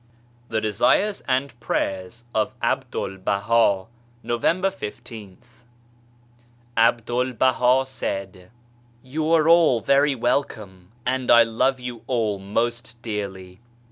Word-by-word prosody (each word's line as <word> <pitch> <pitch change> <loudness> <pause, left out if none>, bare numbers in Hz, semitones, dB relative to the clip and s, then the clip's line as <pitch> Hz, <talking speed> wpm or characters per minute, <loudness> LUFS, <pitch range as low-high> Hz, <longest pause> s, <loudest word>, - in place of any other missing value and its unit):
THE 110 - 0
DESIfcES 120 - +1
AND 130 -1 -1
PRAYERS 95 +4 -3
OF 110 +4 0
ABDUL 120 -6 -2
BAHA 100 0 +1 0.4
November 175 +11 0
t$th. 110 - -9 1.4
A 115 +1 +5
BDUL 120 +1 -3
BAHA 130 +1 +3
said: 100 -7 -4
^ 90 -2 -18 0.5
You 155 +5 -2
are 160 -1 +4
all 165 -7 +5
very 140 +5 +3
welcome, 110 -7 -2
and 130 0 -1
I 115 0 +8
love 125 +4 0
you 125 -2 -7
all 110 -6 0
most 120 +5 -3
dearly. 95 -4 -6
120 Hz, 110 wpm, -23 LUFS, 105-130 Hz, 1.4 s, I